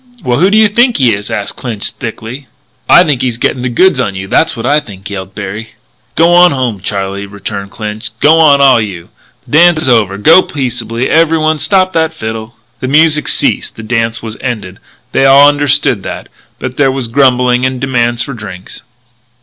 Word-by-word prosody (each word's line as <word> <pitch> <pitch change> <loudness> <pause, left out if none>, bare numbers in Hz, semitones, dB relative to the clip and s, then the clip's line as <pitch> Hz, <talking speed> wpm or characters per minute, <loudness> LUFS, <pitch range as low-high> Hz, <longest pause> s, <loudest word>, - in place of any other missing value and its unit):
"Well, 120 +1 0
who 185 +4 +3
do 210 - +2
you 220 -1 +5
think 240 +4 +1
he 125 -5 +2
is?" 100 0 -5
asked 100 - -4
Clinch 115 -5 -5
thickly. 120 +3 -8 0.4
"I 175 - +7
think 145 -7 -1
he's 125 -3 -2
gettin' 125 +1 -1
the 125 - -2
goods 165 +4 +2
on 100 -6 -2
you, 95 0 -6
that's 160 +6 +1
what 115 - -5
I 145 +3 +2
think," 100 -8 -11
yelled 95 -1 -7
Berry. 105 +3 -7 0.4
"G'wan 175 +2 +5
home, 125 -6 -2
Charlie," 100 0 -4
returned 100 0 -7
Clinch. 110 +1 -6
"G'wan, 155 -2 +4
all 135 -3 +5
o' - - +1
you. 95 -6 -6 0.4
The - - -18
dance 170 -2 +4
is 130 - +1
over. 105 -5 +1
Go 160 - +5
peaceable, 120 -5 -4
every 165 0 +2
one. 155 0 0
Stop 185 +1 +1
that 160 -1 0
fiddle!" 110 -4 -7 0.2
The 130 - -4
music 150 +2 +2
ceased. - - 0
The 110 - -10
dance 115 +1 -2
was 110 -1 -7
ended; 105 -7 -5 0.3
they 135 - +2
all 140 +1 +7
understood 145 -6 +1
that; - - -8 0.3
but 130 0 -6
there 135 -2 +2
was 130 -2 -3
grumbling 125 -1 +2
and 130 0 -1
demands 120 -2 -1
for 140 - -7
drinks. 95 -5 -9
125 Hz, 195 wpm, -11 LUFS, 110-145 Hz, 0.4 s, I